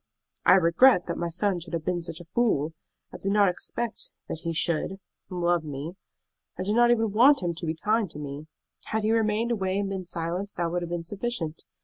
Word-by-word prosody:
"I - - +9
regret 180 +4 +5
that 170 - -4
my 170 0 -1
son 185 +2 0
should 170 0 -7
have 160 - -4
been 180 -1 0
such 165 -1 -6
a - - -9
fool! 165 -11 +1 0.4
I - - -8
did 195 - -1
not 205 -1 +5
expect 220 +5 -3 0.2
that 160 - -4
he 165 - -2
should 170 +3 0 0.3
love 175 -2 +1
me. 150 +2 -5 0.6
I - - -2
did 205 +2 0
not 240 +1 +5
even 225 -3 +2
want 245 +2 +5
him 175 -1 0
to 170 0 -5
be 160 - -1
kind 210 +4 +1
to 150 - -10
me. 145 +1 -6 0.4
Had 220 0 -1
he 215 - +2
remained 225 +1 +1
away 190 -4 0
and 200 -1 -1
been 190 -2 -4
silent, 175 +4 -3
that 170 -1 0
would 175 0 -1
have 170 - -4
been 175 -1 -3
sufficient. 195 -5 -2
180 Hz, 220 wpm, -27 LUFS, 165-210 Hz, 0.6 s, I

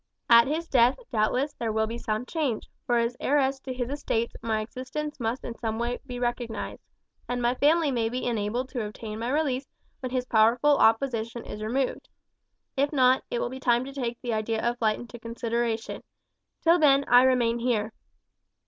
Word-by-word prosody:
At 235 +2 +8
his 320 +4 -2
death 245 -2 +4
doubtless 250 +5 +1
there 230 -2 -3
will 220 0 +1
be 230 +2 -5
some 215 +3 -2
change, 285 -7 -2 0.2
for 240 - +3
as 235 +1 0
heiress 270 -1 +1
to 265 - -7
his 250 -1 -3
estates 235 -5 -2
my 220 -1 0
existence 260 +6 -5
must 235 +2 -2
be - - -5
in 235 - -8
some 220 -1 -2
way 240 +1 -2 0.2
recognized, 240 - -3 0.5
and 245 0 -1
my 240 0 +2
family 300 +3 +3
may 230 -3 0
be 250 +2 -3
enabled 235 +2 -1
to 245 -4 -3
obtain 210 +1 -6
my 235 +2 -2
release 275 -2 0 0.3
when 255 -2 -5
his 250 -1 -1
powerful 240 +6 +4
opposition 230 0 +1
is 210 - -7
removed; 250 +5 -2 0.7
if 280 +2 +1
not, 260 -3 +4
it - - -2
will - - -1
be 260 - -7
time 245 -1 +2
to 275 - -8
take 240 -4 -3
the 240 -2 -1
idea 220 +1 -1
of 240 0 -1
flight 215 -2 +1
into 240 0 -10
consideration; 230 0 -2 0.6
till 335 +2 +5
then 280 -2 +5
I 245 +1 +7
remain 245 -2 +3
here. 225 -3 0
240 Hz, 185 wpm, -27 LUFS, 225-265 Hz, 0.7 s, At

